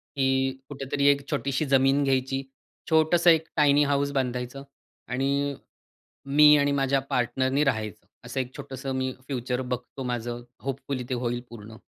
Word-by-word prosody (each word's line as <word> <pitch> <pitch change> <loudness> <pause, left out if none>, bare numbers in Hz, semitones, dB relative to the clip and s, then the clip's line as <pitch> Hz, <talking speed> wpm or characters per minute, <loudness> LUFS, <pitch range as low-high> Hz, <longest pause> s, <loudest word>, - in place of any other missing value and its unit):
की 135 -1 +1
कुठेतरी 140 0 -2
एक 140 0 +4
छोटीशी 140 +2 -1
जमीन 135 +2 +4
घ्यायची. 135 0 0 0.5
छोटंसं 160 +2 +4
एक 160 -1 +4
टायनी 145 -1 +5
हाऊस 140 0 +1
बांधायचं 125 0 -3 0.5
आणि 140 +2 0 0.8
मी 150 0 +8
आणि 145 0 +2
माझ्या 135 -1 +2
पार्टनरनी 130 +3 +1
राहायचं. 110 -8 -2 0.2
असं - - -4
एक 130 0 -4
छोटंसं 135 +1 -6
मी 130 0 -1 0.2
फ्युचर 125 -2 -2
बघतो 125 +1 -5
माझं, 120 -1 -4 0.2
होपफुली 135 -1 -4
ते - - -1
होईल 120 0 -2
पूर्ण. 115 -1 -11
135 Hz, 140 wpm, -26 LUFS, 125-140 Hz, 0.8 s, मी